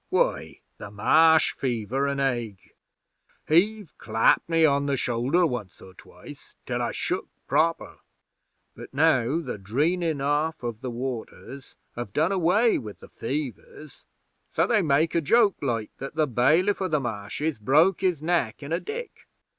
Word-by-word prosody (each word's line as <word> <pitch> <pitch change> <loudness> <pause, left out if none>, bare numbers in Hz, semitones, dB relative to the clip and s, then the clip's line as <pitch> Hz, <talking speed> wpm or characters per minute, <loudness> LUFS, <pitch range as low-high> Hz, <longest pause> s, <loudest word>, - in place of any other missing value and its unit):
'Why, - - -1 0.2
the 105 - -8
Marsh 160 +10 +4
fever 130 +2 -2
an' 140 0 -2
ague. 120 -7 -3 0.8
He've 195 +2 +1
clapped 115 +8 +2
me 165 -1 +4
on 140 -1 +2
the 140 -1 0
shoulder 130 +9 +1
once 120 - -4
or 95 - -14
twice - - -14
till - - -2
I - - -1
shook - - -3 0.2
proper. 165 +1 0 0.8
But - - -12
now 145 -1 +2
the 125 -9 -6
dreenin' 155 - 0
off 145 +2 -1
of 120 -2 -5
the 130 - -4
waters 125 +2 -7 0.2
have 120 -4 -6
done 160 +5 +1
away 195 +5 +2
with 105 -4 -10
the - - -13
fevers; 140 +2 -6 0.5
so 165 - +2
they 210 +1 +2
make 155 0 +2
a 170 - +2
joke, 205 +5 +3
like, 115 -6 -2
that 135 +3 -7
the 155 -1 +2
Bailiff 155 - +2
o' 190 - 0
the 155 -4 0
Marshes 120 +4 -4
broke 155 - +3
his 180 -6 0
neck 160 -8 -1
in 140 - -8
a 170 - +1
dik. 470 - -8
140 Hz, 155 wpm, -25 LUFS, 120-165 Hz, 0.8 s, Marsh